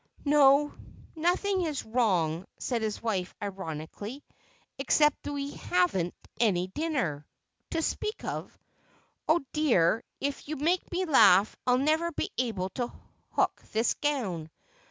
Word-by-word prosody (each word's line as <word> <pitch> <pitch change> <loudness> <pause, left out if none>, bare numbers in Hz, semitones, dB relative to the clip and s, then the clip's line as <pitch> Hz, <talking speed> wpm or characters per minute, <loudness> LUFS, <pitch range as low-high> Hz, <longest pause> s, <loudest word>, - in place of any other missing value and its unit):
"No; 290 0 +5 0.4
nothing 365 +4 +1
is 310 -6 -2
wrong," 190 -8 +1
said 240 -3 -2
his 215 0 -3
wife 190 -6 -2
ironically, 195 - -6 0.6
"except 295 +2 +3
that - - -5
we 285 0 -3
haven't 180 -4 0 0.2
any 190 -6 +3
dinner—to 265 - -4
speak 430 +6 -2
of. - - -5 0.7
Oh, 315 -2 +3
dear, 230 - +3 0.2
if 285 0 -3
you 310 - -2
make 335 +6 0
me 370 +1 0
laugh 210 - +6
I'll 250 0 +5
never 315 +5 +1
be - - -3
able 210 -7 -1
to 240 +5 -3 0.4
hook - - +1
this 225 +2 +2
gown. 205 - -2
250 Hz, 125 wpm, -29 LUFS, 190-300 Hz, 0.7 s, laugh